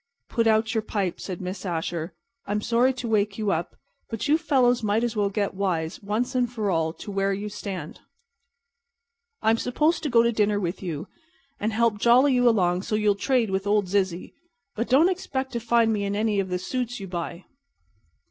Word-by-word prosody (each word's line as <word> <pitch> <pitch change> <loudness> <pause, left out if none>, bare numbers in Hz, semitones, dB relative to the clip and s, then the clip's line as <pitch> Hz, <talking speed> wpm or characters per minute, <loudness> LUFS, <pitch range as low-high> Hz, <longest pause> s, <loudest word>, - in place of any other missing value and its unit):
"Put 230 -1 +1
out 220 0 +2
your 220 - +1
pipe," 200 -4 -2
said 185 -2 -6
Miss 185 +1 -5
Asher. 170 -1 -3 0.3
"I'm 205 +1 0
sorry 240 +4 +2
to 250 -2 -5
wake 210 -2 +1
you 210 -2 0
up, 165 -1 -2 0.3
but 225 +5 -3
you 295 - +5
fellows 250 -6 +2
might 215 +1 +1
as 235 -2 -1
well 205 -1 +1
get 200 0 -1
wise, 175 -4 -2
once 225 +6 -2 0.2
for 215 -5 -1
all, 165 -2 +1
to 205 - -9
where 195 0 0
you 205 +2 -4
stand. 195 -6 -6 1.4
I'm 225 +1 +3
supposed 305 +7 +1
to 300 - -2
go 230 -2 +5
to 235 - +2
dinner 210 -2 +1
with 180 -1 -3
you 165 -4 -4 0.5
and 215 +2 -1
help 225 -1 +1
jolly 255 +5 +5
you 245 -1 +4
along 180 -5 +2
so 215 - -2
you'll 210 -1 +3
trade 230 +1 +1
with 190 +1 -1
old 205 -1 +3
Zizzy, 190 -3 -1 0.4
but 230 +2 -2
don't 280 +7 +6
expect 270 -8 -2
to 235 - -1
find 230 -1 +2
me 205 -1 -1
in 200 0 -1
any 210 -1 +1
of 190 -1 -1
the 180 - -1
suits 245 +5 -3
you 195 - -7
buy." 175 0 -5
210 Hz, 195 wpm, -25 LUFS, 195-235 Hz, 1.4 s, don't